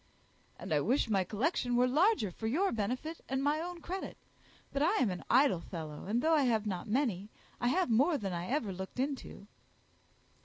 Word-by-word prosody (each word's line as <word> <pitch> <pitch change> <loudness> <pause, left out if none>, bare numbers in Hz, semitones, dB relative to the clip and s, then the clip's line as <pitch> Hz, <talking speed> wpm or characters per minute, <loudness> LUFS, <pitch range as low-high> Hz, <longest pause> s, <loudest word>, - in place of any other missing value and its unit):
"And 180 - -4
I 150 - +4
wish 230 - +1
my 195 -2 +3
collection 245 - 0
were 245 +1 +4
larger 305 - +3
for 220 +5 -5
your 355 - +1
benefit 255 +10 -3
and 265 +1 -1
my 295 +2 +2
own 350 0 -6
credit; 370 +4 -5 0.6
but 280 - 0
I 315 - +3
am 240 -7 +2
an 180 - -6
idle 255 - +4
fellow; 155 -4 -7
and 230 +4 0
though 325 +1 +4
I 305 - +5
have 220 -3 +1
not 190 0 -3
many, 215 -5 0 0.3
I 245 - 0
have 340 +1 +2
more 285 +8 +4
than 195 -6 -4
I 175 +1 -3
ever 250 -8 -1
looked 190 +6 -7
into." 270 -6 -3
245 Hz, 195 wpm, -32 LUFS, 200-295 Hz, 0.6 s, I